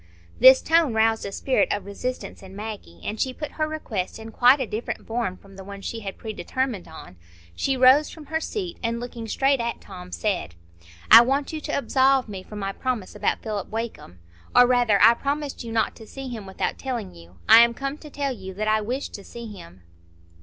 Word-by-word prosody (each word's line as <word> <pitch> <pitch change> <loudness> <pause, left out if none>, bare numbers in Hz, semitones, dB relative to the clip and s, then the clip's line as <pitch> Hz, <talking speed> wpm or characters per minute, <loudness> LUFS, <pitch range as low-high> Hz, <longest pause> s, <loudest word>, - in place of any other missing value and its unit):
This 260 +2 +8
tone 325 -6 +3
roused 225 -1 +2
a - - -6
spirit 255 -1 +1
of 205 - -2
resistance 250 +6 -5
in 190 0 -12
Maggie, 205 - -8
and 215 - -3
she 260 -1 -1
put 300 -1 -6
her 310 -1 -1
request 230 -12 -4
in 225 0 -9
quite 250 +5 +5
a 260 - 0
different 220 +1 -5
form 225 -5 -2
from 195 0 -17
the 195 - -8
one 200 0 -9
she 230 - -5
had 195 -3 -7
predetermined 225 -1 -3
on. 160 - -12 0.4
She 270 -1 0
rose 260 +4 +6
from 315 -2 -11
her 320 +2 -2
seat, 360 +1 -5
and 230 0 -1
looking 240 -2 -7
straight 270 +4 +2
at 235 0 -2
Tom, 180 -2 -11
said,— 190 - -2 0.6
"I 225 +2 +12
want 275 +5 0
you 310 - -4
to - - -2
absolve 270 -2 +3
me 195 -3 -7
from 210 +3 -10
my 195 -1 -3
promise 235 -3 -3
about - - -1
Philip 210 -4 -4
Wakem. 225 - -6 0.4
Or 245 - +8
rather, 245 -5 +3
I 230 - +9
promised 280 +2 -3
you 230 - -7
not 225 -2 +1
to 220 - -12
see 270 +2 -7
him 220 -5 -7
without 190 - -3
telling 240 -7 -4
you. 85 +2 -16
I - - +10
am 235 0 +5
come 275 +2 -4
to 300 - -11
tell 280 -2 -2
you 190 -3 -9
that 215 +2 -2
I 215 0 +3
wish 250 +6 -3
to 200 - -9
see 235 +3 -9
him." 90 - -13
230 Hz, 215 wpm, -24 LUFS, 200-265 Hz, 0.6 s, I